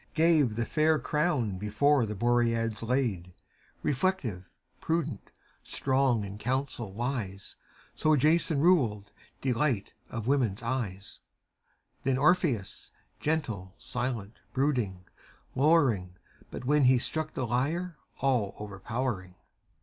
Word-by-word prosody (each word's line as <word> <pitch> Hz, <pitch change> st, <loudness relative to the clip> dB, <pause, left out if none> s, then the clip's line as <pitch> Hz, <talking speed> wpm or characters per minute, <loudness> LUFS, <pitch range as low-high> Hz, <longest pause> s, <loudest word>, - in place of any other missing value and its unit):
Gave 155 Hz, -8 st, +4 dB
the 115 Hz, 0 st, -1 dB
fair 155 Hz, +2 st, +3 dB
crown 150 Hz, -, 0 dB
before 115 Hz, +5 st, +2 dB
the 105 Hz, -, -4 dB
Boreads 115 Hz, -1 st, +1 dB
laid: 115 Hz, -8 st, -1 dB, 0.5 s
Reflective, 130 Hz, -, -1 dB, 0.3 s
prudent, 165 Hz, 0 st, -2 dB, 0.3 s
strong, 130 Hz, -4 st, +1 dB
in 100 Hz, +1 st, -7 dB
council 125 Hz, -3 st, -2 dB
wise. 110 Hz, -3 st, -4 dB, 0.4 s
So 155 Hz, 0 st, +3 dB
Jason 155 Hz, +1 st, +3 dB
ruled, 115 Hz, -, +3 dB, 0.3 s
delight 125 Hz, -4 st, 0 dB, 0.2 s
of 115 Hz, -2 st, -5 dB
women's 120 Hz, -7 st, +1 dB
eyes: 115 Hz, -6 st, -3 dB, 0.8 s
Then 130 Hz, -1 st, +1 dB
Orpheus, 145 Hz, -, +1 dB, 0.3 s
gentle, 115 Hz, -12 st, -2 dB
silent, 120 Hz, +2 st, -4 dB
brooding, 120 Hz, -10 st, 0 dB, 0.5 s
lowering, 130 Hz, -, +3 dB, 0.3 s
But -, -, -7 dB
when 145 Hz, 0 st, +4 dB
he 130 Hz, 0 st, +6 dB
struck 155 Hz, +5 st, -3 dB
the 130 Hz, -, -1 dB
lyre, 155 Hz, +9 st, -1 dB, 0.3 s
all 125 Hz, -8 st, +1 dB
overpowering. 105 Hz, -1 st, -4 dB
125 Hz, 105 wpm, -29 LUFS, 105-145 Hz, 0.8 s, he